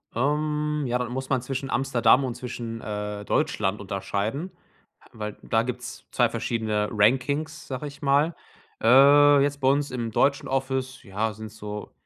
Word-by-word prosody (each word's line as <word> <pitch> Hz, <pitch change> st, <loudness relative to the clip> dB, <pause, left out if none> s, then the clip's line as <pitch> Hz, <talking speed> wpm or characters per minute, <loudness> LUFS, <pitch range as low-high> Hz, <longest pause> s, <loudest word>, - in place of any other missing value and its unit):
Ähm, 150 Hz, +3 st, 0 dB
ja, 120 Hz, -, +1 dB
da 125 Hz, -, -2 dB
muss 130 Hz, +1 st, -4 dB
man 130 Hz, -3 st, +1 dB
zwischen 135 Hz, +1 st, -4 dB
Amsterdam 135 Hz, +1 st, +3 dB
und 125 Hz, -2 st, -4 dB
zwischen, 115 Hz, -2 st, -6 dB
äh, 105 Hz, -1 st, -4 dB
Deutschland 95 Hz, 0 st, 0 dB
unterscheiden, 105 Hz, -, -3 dB, 0.6 s
weil 105 Hz, -2 st, -6 dB
da 115 Hz, 0 st, +1 dB
gibt's 125 Hz, 0 st, -6 dB
2 -, -, +3 dB
verschiedene 110 Hz, -2 st, -1 dB
„Rankings“, 135 Hz, +8 st, +1 dB
sage 135 Hz, +2 st, -4 dB
ich 140 Hz, -, -11 dB
mal. 145 Hz, +4 st, +2 dB, 0.5 s
Äh, 140 Hz, +3 st, +7 dB
jetzt 145 Hz, 0 st, 0 dB
bei 130 Hz, -, +4 dB
uns 140 Hz, +1 st, +1 dB
im 120 Hz, -3 st, -3 dB
deutschen 140 Hz, +5 st, +1 dB
Office, 130 Hz, -1 st, -2 dB
ja, 105 Hz, +2 st, -2 dB
sind's 110 Hz, 0 st, -10 dB
so 105 Hz, 0 st, -7 dB
125 Hz, 155 wpm, -25 LUFS, 110-140 Hz, 0.6 s, Äh